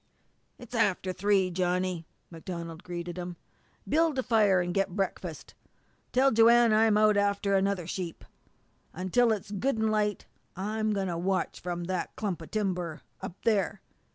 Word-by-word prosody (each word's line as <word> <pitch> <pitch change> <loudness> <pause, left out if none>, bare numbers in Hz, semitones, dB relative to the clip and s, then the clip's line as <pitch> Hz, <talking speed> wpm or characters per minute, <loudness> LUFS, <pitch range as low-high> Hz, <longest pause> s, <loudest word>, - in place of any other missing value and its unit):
"It's 245 0 -13
after 190 -5 +1
three, 190 -1 +2
Johnny," 180 -1 -1 0.2
MacDonald 165 0 -7
greeted 175 -1 -6
him. 175 -1 -6 0.5
"Build 320 -2 +2
a 260 - +1
fire 215 -6 +4
and 175 0 -1
get 195 -2 0
breakfast. 185 -4 -4 0.6
Tell 270 +2 +4
Joanne 230 0 +6
I'm 215 -1 +4
out 215 -1 +4
after 200 0 +1
another 195 -2 +1
sheep. 175 -1 -5 0.7
Until 190 +7 +2
it's 205 -2 -3
good 240 +7 0
an' 220 0 +1
light 210 -2 0 0.3
I'm 215 +3 -1
going 195 -2 -1
to 170 -2 -2
watch 190 +2 -1
from 175 0 -4
that 185 0 -3
clump 195 -6 -3
of 160 - -10
timber 180 -6 -2 0.2
up 175 - -6
there. 210 -4 +1
195 Hz, 155 wpm, -29 LUFS, 180-215 Hz, 0.7 s, Joanne